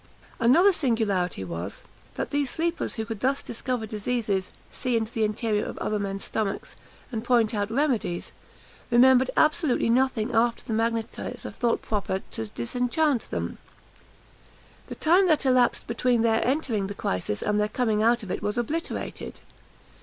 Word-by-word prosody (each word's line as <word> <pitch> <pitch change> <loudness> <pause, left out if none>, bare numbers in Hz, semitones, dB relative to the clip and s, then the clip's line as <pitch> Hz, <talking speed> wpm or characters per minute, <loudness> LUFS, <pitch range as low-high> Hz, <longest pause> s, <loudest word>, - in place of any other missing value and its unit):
Another 320 +13 +6
singularity 210 - 0
was, 85 +2 -6 0.3
that - - -3
these 285 -2 +1
sleepers 335 +4 -1
who 220 - -3
could 225 -2 -5
thus 270 +4 0
discover 240 0 -3
diseases, 215 -3 -2 0.2
see 250 -2 -1
into 220 0 -3
the 225 - 0
interior 215 0 0
of - - -6
other 210 0 -1
men's 195 -1 -3
stomachs, 210 -3 -3 0.4
and 225 -2 -3
point 240 -2 +3
out 205 -1 -1
remedies, 235 - -1 0.6
remembered 255 +1 +6
absolutely 305 -7 +3
nothing 250 -2 +1
after 230 +1 +2
the 225 - -4
magnetiser 225 0 -2
thought 235 -2 0
proper 195 -3 -2
to 110 - -4
disenchant 250 - 0
them. - - -4 1.3
The - - -7
time 360 +4 +4
that 310 -4 +3
elapsed 255 -2 +3
between 235 0 +1
their 225 -1 +3
entering 245 -7 0
the 200 - -6
crisis 100 - -2
and 210 0 +1
their 210 0 +1
coming 220 -4 +1
out 235 +1 +3
of 195 - -6
it - - -3
was 210 +2 -2
obliterated. 300 +8 -3
230 Hz, 155 wpm, -26 LUFS, 210-255 Hz, 1.3 s, Another